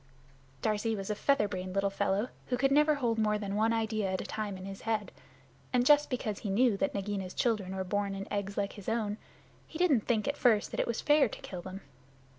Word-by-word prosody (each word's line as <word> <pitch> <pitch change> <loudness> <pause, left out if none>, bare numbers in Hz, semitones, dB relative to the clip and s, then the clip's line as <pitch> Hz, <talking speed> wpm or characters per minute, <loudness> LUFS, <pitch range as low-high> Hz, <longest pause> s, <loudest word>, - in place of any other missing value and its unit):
Darzee 220 +1 +1
was 195 0 -4
a - - -1
feather 275 -1 +2
brained 185 -1 -5
little 195 0 +1
fellow 200 +4 0 0.2
who 250 - 0
could 270 +2 +2
never 300 +2 +5
hold 235 -5 0
more 210 -1 +2
than 200 -2 -4
one 220 +2 +2
idea 220 -3 0
at 190 - -1
a - - -3
time 210 -3 -4
in 185 - -8
his 195 0 -7
head. 220 -2 -1 0.6
And 245 -1 +2
just 295 +1 +5
because 215 -5 -2
he 210 - -4
knew 225 +3 +3
that 285 +5 -1
Nagaina's 195 -2 -3
children 205 -6 0
were 190 - -2
born 200 +1 -1
in 195 0 -5
eggs 200 -1 -3
like 200 -1 -1
his 205 0 -6
own, 220 -2 -1 0.5
he 315 - -8
didn't 305 -11 +3
think 220 -4 +1
at 285 0 -1
first 225 -5 +3
that - - -4
it - - +1
was 235 - -2
fair 295 -4 +4
to - - -9
kill 180 -2 -6
them. 190 +2 -8
210 Hz, 235 wpm, -31 LUFS, 195-240 Hz, 0.6 s, never